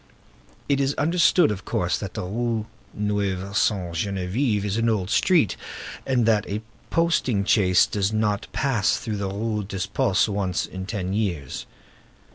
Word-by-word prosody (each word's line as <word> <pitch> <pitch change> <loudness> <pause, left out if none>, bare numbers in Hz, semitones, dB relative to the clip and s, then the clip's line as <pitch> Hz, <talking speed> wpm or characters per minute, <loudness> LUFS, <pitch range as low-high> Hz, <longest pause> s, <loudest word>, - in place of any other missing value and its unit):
It 140 -1 +2
is 135 +1 +1
understood, 170 - +4
of 95 -2 -5
course, - - 0
that - - -6
the - - -3
Rue 110 +3 -1 0.3
Neuve 100 -2 -2
Sainte 95 -6 +1
Geneviève 100 - 0
is 100 -1 -1
an 115 0 +2
old 100 -3 0
street, 170 - +3 0.5
and 125 -3 +2
that 110 -3 +2
a 105 +2 -3 0.3
posting 145 -11 +1
chaise 90 -4 +4
does 100 0 -1
not 105 -2 0
pass 125 -8 +1
through 110 -2 -4
the 100 -1 -2
Rue 105 +1 -2
des 95 -1 -3
Postes 100 0 +2
once 100 -3 -1
in 95 0 -7
ten 95 -4 -3
years. 90 -11 -2
105 Hz, 155 wpm, -24 LUFS, 95-115 Hz, 0.5 s, understood